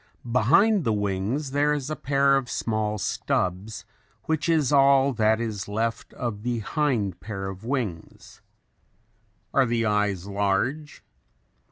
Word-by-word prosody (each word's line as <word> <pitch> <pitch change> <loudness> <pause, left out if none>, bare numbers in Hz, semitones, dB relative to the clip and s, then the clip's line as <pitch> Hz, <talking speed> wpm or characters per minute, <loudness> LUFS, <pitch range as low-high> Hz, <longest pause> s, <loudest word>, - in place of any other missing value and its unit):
Behind 180 - +4
the 115 - +1
wings 105 +8 -2
there 145 +1 +2
is 145 0 -3
a - - -1
pair 140 0 +2
of 135 -2 -1
small 110 -1 -1
stubs 95 +1 -2 0.4
which 160 +1 -1
is 155 -5 +2
all 135 -1 +5
that 110 -1 +2
is 110 -5 -4
left 115 +3 -2
of 115 -4 -4
the 120 +1 -2
hind 115 - -1
pair 95 -2 -5
of 95 +1 -8
wings. 115 -10 -5 1.1
Are 135 -2 +3
the 115 0 0
eyes 105 -3 0
large? 100 +10 -1
115 Hz, 135 wpm, -25 LUFS, 105-140 Hz, 1.1 s, all